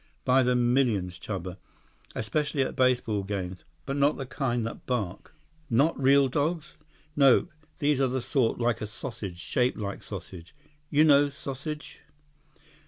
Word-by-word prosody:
"By 130 +1 +5
the 125 0 +2
millions, 120 -8 +1
Chuba. 95 -2 -5 0.6
Especially 140 +4 0
at - - -4
baseball 125 -5 +2
games. 95 -2 -5 0.2
But 135 +1 -3
not 140 +2 +3
the 135 - -4
kind 120 -3 -1
that 115 - -7
bark." 110 - -3 0.3
"Not 140 +7 +3
real 135 +1 +5
dogs?" 150 +5 -1 0.4
"Nope. 140 -1 +5 0.3
These 145 -3 +1
are 130 0 +1
sort 125 -1 +1
of - - -8
like 120 -1 +1
a 110 - -3
sausage—shaped 115 +1 -2
like 100 -2 -4
sausage. 85 - -9 0.3
You 150 +1 +4
know 145 -2 +5
sausage?" 140 +2 -7
125 Hz, 140 wpm, -27 LUFS, 105-140 Hz, 0.6 s, By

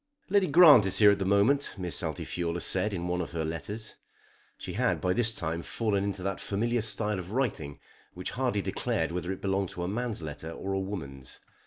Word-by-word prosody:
"Lady 200 -1 +3
Grant 150 - +8
is 95 0 +2
here 105 0 +7
at 100 - 0
this 95 - -1
moment," 105 +9 +2
Miss 90 -3 -1
Altifiorla 85 +1 -3
said 95 +3 +2
in 90 -3 -3
one 90 0 -1
of 85 - -6
her 80 -2 -2
letters. 105 +7 -4 0.6
She - - -7
had - - +1
by 90 0 +1
this 120 0 +2
time 85 -5 -3
fallen 100 0 -1
into 100 -2 -3
that 95 -1 -2
familiar 115 +4 0
style 105 -2 -2
of 90 +3 -8
writing 100 - -2 0.4
which 90 0 -4
hardly 125 -6 -1
declared 80 0 -1
whether 90 +1 -3
it 95 - -6
belonged 95 -1 0
to 85 - -6
a - - -2
man's 110 -2 -3
letter 75 +1 -6
or 95 +3 -5
a 95 - 0
woman's. 75 -10 -7
95 Hz, 205 wpm, -29 LUFS, 85-110 Hz, 0.6 s, Grant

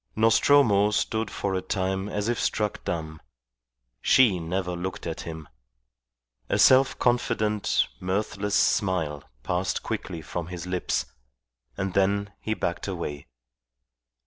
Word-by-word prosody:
Nostromo 110 -2 +5
stood 110 +1 -1
for 100 0 -3
a 95 - 0
time 95 +1 -2
as 105 0 -2
if 120 0 0
struck 105 -1 -1
dumb. 80 -2 -4 0.8
She 115 -9 +5
never 90 +2 -2
looked 90 +2 -5
at 80 -1 -4
him. 80 -3 -7 1.0
A - - +2
self 130 +1 +5
confident, 115 -4 +1
mirthless 100 +2 -1
smile 85 -8 +1 0.2
passed 90 +1 -1
quickly 85 -3 -4
from 85 +1 -5
his 90 -1 -6
lips, 90 -1 -1 0.7
and 95 -1 -2
then 100 +1 +1
he 110 - -2
backed 85 -1 -3
away. 85 -6 -5
95 Hz, 120 wpm, -26 LUFS, 90-105 Hz, 1.0 s, Nostromo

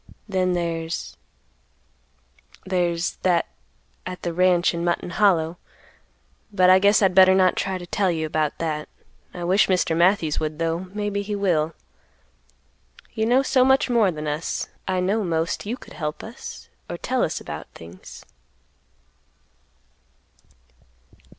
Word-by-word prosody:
Then 185 -2 0 2.1
there's—there's—that 175 -1 0 0.6
at 185 0 -7
the 170 - -2
ranch 180 0 +3
in 170 0 -3
Mutton 175 0 -1
Hollow; 175 -5 +2 0.9
but 185 -2 +5
I 185 - +7
guess 200 +1 +4
I'd 190 -1 +3
better 190 0 +7
not 185 -1 +4
try 190 -1 -2
to 175 - -8
tell 195 +2 0
you 160 -2 -1
about 155 -1 -1
that. 155 -2 -3 0.4
I 175 - -7
wish 185 +4 +3
Mr. 180 -3 +1
Matthews 170 -3 +2
would, 155 -1 -3
though; 165 +2 -2
maybe 205 0 -2
he 205 +1 -4
will. 165 -5 0 1.4
You 220 0 -1
know 255 +3 +4
so 265 -1 +3
much 265 0 +3
more 225 -5 +4
than 155 -3 -5
us; 150 +3 -3 0.2
I 185 -1 0
know 205 +4 0
most 165 +2 -2
you 240 +4 -3
could - - -14
help 150 -2 -5
us - - -9 0.2
or - - -4
tell - - -1
us - - -1
about - - -7
things." 85 +2 -12
180 Hz, 135 wpm, -23 LUFS, 165-200 Hz, 2.1 s, I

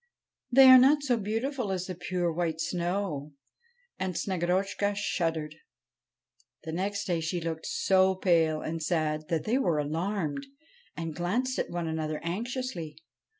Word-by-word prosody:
' - - -55
They 270 - +10
are 260 0 +10
not 280 +3 +5
so 255 -4 +2
beautiful 225 +2 -2
as 185 -1 -2
the 185 - -5
pure, 175 -1 -2
white 165 -1 -1
snow.' 170 -3 -2 0.7
And 185 -2 -2
Snegorotchka 190 +3 0
shuddered. 165 -6 -1 1.1
The 160 - -5
next 200 +4 -2
day 175 -4 0
she 165 +2 -2
looked 165 -1 -4
so 190 - +3
pale 165 -4 +2
and 165 +1 -4
sad 155 -2 -1
that 160 -2 -1
they 240 +5 +1
were 175 - +1
alarmed, 165 - -2 0.5
and 165 -2 -4
glanced 240 +10 -1
at - - -2
one 175 -1 -3
another 155 -1 -2
anxiously. 190 - -4
175 Hz, 150 wpm, -29 LUFS, 160-205 Hz, 1.1 s, They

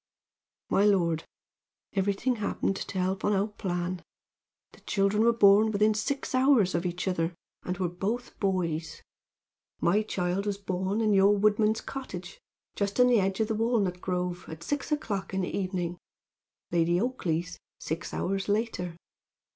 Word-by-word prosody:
"My 195 - +4
lord, 170 -6 +2 0.7
everything 200 +6 0
happened 200 -2 -1
to 190 - -5
help 185 +1 -1
on 210 - +2
our 200 +2 +1
plan. 180 -3 -3 0.7
The - - -18
children 200 +2 +1
were 235 - +6
born 210 -1 +6
within 215 +1 +3
six 270 +7 -2
hours 255 -7 +4
of 170 +1 0
each 175 +2 -4
other 170 -2 0 0.3
and 180 0 -4
were 185 -1 0
both 200 +8 -4
boys. 165 -5 -1 0.8
My 200 +5 +3
child 190 -1 -2
was 200 -1 -1
born 190 +2 -2
in 215 -2 +3
your 200 +1 +5
woodman's 215 +1 +3
cottage, 190 -9 -7 0.4
just 200 +2 -2
in 250 - +8
the 240 -3 +5
edge 195 +1 0
of 220 - +1
the 220 - -1
walnut 215 -5 0
grove, 180 -1 -2
at 160 +1 -8
six 290 - -3
o'clock 200 -10 -2
in 190 - +1
the 180 - -3
evening, 180 -3 -2 0.7
Lady 170 +1 +2
Oakleigh's 180 -8 -2 0.2
six 160 +2 -4
hours 195 +2 -2
later. 205 -5 -1
195 Hz, 155 wpm, -28 LUFS, 180-215 Hz, 0.8 s, in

